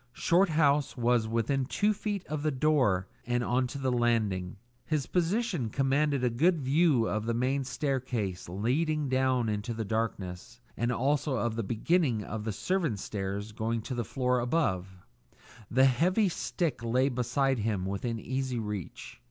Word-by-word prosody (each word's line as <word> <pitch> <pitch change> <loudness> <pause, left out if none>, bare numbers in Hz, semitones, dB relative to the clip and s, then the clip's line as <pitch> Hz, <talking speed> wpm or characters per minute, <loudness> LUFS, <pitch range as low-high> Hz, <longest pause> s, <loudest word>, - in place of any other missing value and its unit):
Shorthouse 155 -6 +2
was 120 -2 +2
within 115 +4 0
two 205 +10 +1
feet 205 -2 -3
of 150 -1 -3
the 155 - +1
door 130 -10 +2 0.2
on 120 +1 +1
to 130 - -7
the 135 -2 0
landing; 110 -7 0 0.3
his 150 +1 -1
position 180 - 0
commanded 135 +2 +1
a 125 - +3
good 165 +8 +3
view 140 -3 +3
of 110 +1 -2
the 115 - 0
main 130 +3 0
staircase 125 - -2
leading 140 - 0
down 130 -2 +2
into 105 +2 -2
the 110 -1 -3
darkness, 110 0 -3 0.2
and 120 +1 0
also 140 +3 +1
of 120 -2 -1
the 115 - -1
beginning 115 - +1
of 105 +1 -5
the 110 - -1
servants' 160 - -1
stairs 100 +1 -4
going 110 +1 -2
to 130 - -4
the 120 -1 -1
floor 125 +3 0
above; 95 - -1 0.7
the 130 +3 +4
heavy 180 - +3
stick 165 - -2
lay 125 +3 +2
beside 135 +1 0
him 105 -3 -1
within 115 +4 -3
easy 130 +1 -2
reach. 105 -5 -6
125 Hz, 155 wpm, -29 LUFS, 110-145 Hz, 0.7 s, the